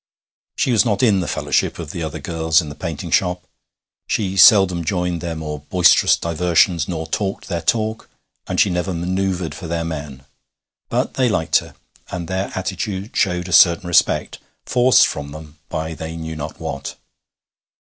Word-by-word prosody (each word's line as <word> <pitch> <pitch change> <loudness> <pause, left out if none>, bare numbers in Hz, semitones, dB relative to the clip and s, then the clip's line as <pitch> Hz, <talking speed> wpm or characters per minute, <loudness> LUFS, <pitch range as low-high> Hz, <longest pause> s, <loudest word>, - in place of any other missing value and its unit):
She 130 - 0
was 110 -3 +4
not 105 -3 0
in 105 -6 +4
the 90 - -3
fellowship - - -1
of 80 -4 -7
the 85 - -6
other 80 -2 -4
girls 80 -1 +1
in 80 -4 -4
the - - -7
painting 80 -1 -6
shop. 90 -2 +1 0.6
She 95 -3 -1
seldom 95 -3 +6
joined 90 -1 -2
their 85 -1 -4
more 75 -1 -5
boisterous 85 +4 +4
diversions, 85 0 +1
nor 80 -3 -4
talked 95 +4 -3
their 85 -2 -2
talk, 110 +5 -1 0.4
and - - -2
she 100 - +4
never 90 +1 -2
manoeuvred 90 0 -2
for 90 - -8
their 85 0 -2
men. 70 -4 -7 0.6
But - - -1
they 130 -2 +1
liked 80 -6 +2
her, - - -13 0.3
and 85 -2 -5
their 95 +2 -3
attitude 95 +2 -4
showed 90 -2 0
a 90 - -4
certain 85 +2 +5
respect, 85 -1 +1 0.3
forced 125 0 +5
from 70 0 -5
them 75 0 -12
by 80 +1 -3
they 80 +1 -7
knew 80 -1 -6
not 75 0 -7
what. 70 0 -5
85 Hz, 170 wpm, -20 LUFS, 80-95 Hz, 0.6 s, seldom